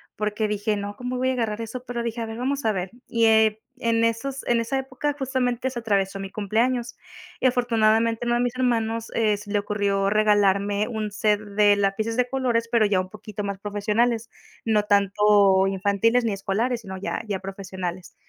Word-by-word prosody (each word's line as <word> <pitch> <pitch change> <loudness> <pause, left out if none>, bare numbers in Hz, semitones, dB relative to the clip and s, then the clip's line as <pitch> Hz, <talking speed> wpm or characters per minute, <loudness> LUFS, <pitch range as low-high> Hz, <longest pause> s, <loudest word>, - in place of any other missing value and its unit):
porque 210 +1 -1
dije: 210 0 -1
"No, 205 0 -5
cómo 250 0 -4
voy 260 +1 +1
a - - 0
agarrar 225 -3 -2
eso". 245 +3 -6
Pero 240 -1 -3
dije: 235 0 -3
"A 225 - -3
ver, 225 +1 -6
vamos 275 +1 -2
a 220 - +3
ver". 185 0 -3 0.2
Y, 230 -1 +2
eh, 220 -1 +4 0.2
en 230 -1 +1
esos 255 +4 -1
en 235 -1 +3
esa 270 +4 -2
época 270 +2 -3
justamente 260 -1 -1
se 240 - -4
atravesó 195 -3 0
mi 195 0 -5
cumpleaños. 235 +4 0 0.4
Y 260 - +3
afortunadamente, 230 -2 +2
uno 240 - +2
de 240 - +1
mis 245 0 -1
hermanos, 230 -3 0
eh, 215 -2 +2
se 205 0 -10
le 205 - +2
ocurrió 200 -1 0
regalarme 205 -1 +2
1 220 -3 -3
set 210 0 +1
de 205 0 +3
lápices 205 +3 0
de 250 0 +1
colores, 240 -3 0
pero 230 -3 +4
ya 200 -2 +2
un 185 - -8
poquito 215 0 -7
más 200 -1 -3
profesionales, 215 +3 0 0.4
no 215 -2 +2
tanto 200 -1 +4
infantiles 200 +5 +1
ni 215 - 0
escolares, 225 +5 -1
sino 190 -2 -7
ya 200 +4 -4
ya 195 -2 -2
profesionales. 190 -2 -6
220 Hz, 195 wpm, -24 LUFS, 205-235 Hz, 0.4 s, eh